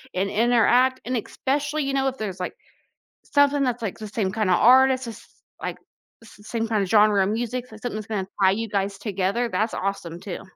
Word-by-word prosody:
and 195 +2 0
interact, 245 +3 +3
and 255 +2 -2
especially, 290 +6 -2
you 275 0 -2
know, 270 0 +1
if 265 0 -3
there's 195 -4 -5
like 180 - -4 0.7
something 285 0 +3
that's, 245 -2 -1
like, 210 -4 -4
the 215 - -6
same 205 -2 -2
kind 215 -2 -1
of 180 - +5
artist, 260 +1 +5
s 225 -2 -7
s - - -19 0.3
like, - - -4 0.5
s 220 - -16
same 225 -1 -2
kinda 215 -3 0
genre 210 0 +4
of 195 - 0
music, 240 +3 -2
something 220 +1 -7
that's 215 -1 -6
gonna 200 -4 -3
tie 190 -1 +6
you 225 +3 -2
guys 195 0 -1
together, 200 +3 -1
that's 220 0 -1
awesome 180 -3 -4
too. 185 0 -6
220 Hz, 205 wpm, -24 LUFS, 200-250 Hz, 0.7 s, tie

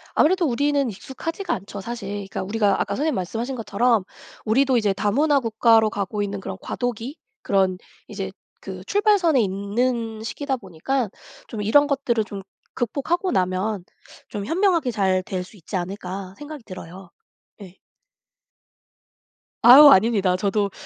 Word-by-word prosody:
아무래도 350 +2 +3
우리는 280 +1 +1
익숙하지가 330 - -5
않죠 200 +1 -6
사실. 230 -3 -6
그러니까 200 -2 -5
우리가 205 0 +1
아까 - - -1
선생님 305 +3 0
말씀하신 225 +8 -3
것처럼 225 -1 +1 0.4
우리도 260 +3 +3
이제 210 -4 +1
다문화 275 +9 +2
국가로 225 -2 +3
가고 205 -1 -3
있는 200 0 -4
그런 190 0 -6
과도기, 245 +4 -4 0.2
그런 190 -2 +1 0.3
이제 - - -5 0.3
그 - - -8
출발선에 400 - +3
있는 220 +3 -2
시기다 270 +3 -3
보니까 210 +5 -2 0.4
좀 215 -2 -5
'이런 285 +8 +4
것들을 260 -6 0
좀 200 -1 -7 0.3
극복하고 330 - -1
나면 185 +2 -1 0.5
좀 200 -1 -5
현명하게 335 - +1
잘 190 -3 +1
될 185 -1 -4
수 205 +3 -16
있지 180 +4 -8
않을까.' 185 +1 -5
생각이 295 -2 -9
들어요. 185 -1 -10 0.5
예. 185 -2 -11 1.9
아유. 280 +5 +11
아닙니다. 195 -5 +4
저도, 200 +1 0
220 Hz, 325 characters per minute, -23 LUFS, 195-270 Hz, 1.9 s, 아유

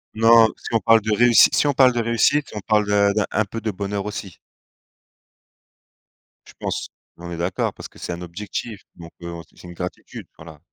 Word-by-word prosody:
Non, 115 0 +6
si - - -9
on 115 - +3
parle 115 0 +4
de 110 +1 -3
réussi 120 +1 +6
si - - +2
on 145 - +2
parle 130 -2 +5
de 120 - -1
réussite, 115 +5 +1
on - - -3
parle 105 +1 +1
de 100 0 +2 0.2
un 110 +1 0
peu 115 +3 -7
de 110 - -3
bonheur 100 0 -4
aussi. 100 -4 -7 2.1
Je - - -15
pense. - - -4 0.3
On 85 0 -9
est 85 - -5
d'accord 85 +2 -2
parce - - -10
que - - -18
c'est - - -5
un 85 - -8
objectif 100 +4 -6
donc 85 -1 -12
heu, 85 - -7
aussi 85 0 -11
c'est - - -13
une 90 - -10
gratitude, 90 +1 -8
voilà. 80 -1 -13
105 Hz, 200 wpm, -21 LUFS, 90-115 Hz, 2.1 s, Non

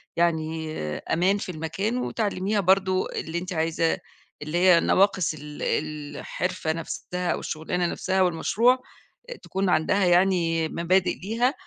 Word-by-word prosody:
يعني 160 -2 0 0.3
أمان 190 +4 +1
في 195 - -6
المكان، 180 +8 -2
وتعلّميها 210 -4 -1
برضه 190 0 +2
اللي 160 +2 -4
أنتِ 180 +1 -4
عايزة 165 0 +1 0.4
اللي 155 +3 -2
هي 180 -1 +6
نواقص 190 -3 +2
ال 150 -1 -9
الحِرفة 155 +3 -2
نَفْسها 180 +2 -4
أو - - -1
الشغلانة 175 +3 -2
نَفْسها 190 +2 0
والمشروع، 225 +8 +3 0.5
آآ - - -5
تكون 195 0 -1
عندها 185 +3 +2
يعني 175 -3 +3
مبادئ 180 +3 +1
ليها، 230 +7 0
180 Hz, 130 wpm, -25 LUFS, 160-195 Hz, 0.5 s, هي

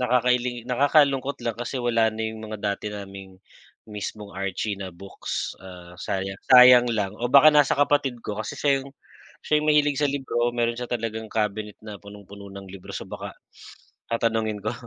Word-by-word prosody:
nakakailing 125 0 +1
nakakalungkot 140 +1 +2
lang 115 -1 -2
kasi 120 +3 -5
wala 115 -2 +2
na 110 +1 -6
yung 110 0 -5
mga 110 0 -6
dati 100 0 -2
naming 95 -2 -9 0.5
mismong 105 0 -7
Archie 100 +2 -3
na 95 - -5
books, 95 +3 -5
ah, 90 -2 -12
sayang 95 +1 -4
sayang 125 -1 +9
lang 105 -3 -1
o 120 +1 -2
baka 140 +4 +8
nasa 145 -1 +4
kapatid 140 -4 +1
ko 105 - -4
kasi 110 - -5
siya 140 -2 +2
yung 135 0 -12 0.5
siya 150 - +2
yung 155 - -2
mahilig 145 -2 +3
sa 145 - +2
libro, 125 -4 -1
meron 120 -1 0
siya 125 0 -5
talagang 115 -2 -3
cabinet 105 -1 -2
na 105 -1 -9
punong-puno 100 0 -12
ng 100 -1 -10
libro. 95 -1 -10
So, - - -6
baka - - -7 0.8
tatanungin 110 -2 0
ko 110 - -1
110 Hz, 175 wpm, -24 LUFS, 100-125 Hz, 0.8 s, sayang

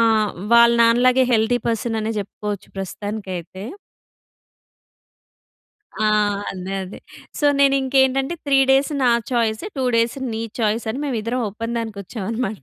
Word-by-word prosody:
ఆ! - - +5 0.5
వాళ్ళ 235 0 +7
నాన్న 230 +1 +4
లాగే 255 +1 +5
హెల్తీ 230 +2 +2
పర్సన్ 225 0 -1
అనే 220 +1 -2
చెప్పుకోవచ్చు 205 0 -6
ప్రస్తుతానికైతే. 195 -2 -6 2.3
ఆ! 215 - +1 0.5
అదే. 185 0 -6
అదే. 185 - -10 0.4
సో - - -2 0.2
నేను 275 -1 +5
ఇంకేంటంటే 265 +3 +2
3 280 -2 +3
డేస్ 270 +3 +3
నా 250 - +4 0.2
చాయిస్, 230 -1 0
2 265 - -1
డేస్ 230 +3 +1 0.2
నీ 220 - -3 0.2
చాయిస్ 225 +1 0
అని 250 - -4
మేమిద్దరం 240 -2 -2
ఒప్పందానికి 230 0 -4
వచ్చాం 200 +1 -7
అన్నమాట. 220 - -3
230 Hz, 135 wpm, -21 LUFS, 210-255 Hz, 2.3 s, వాళ్ళ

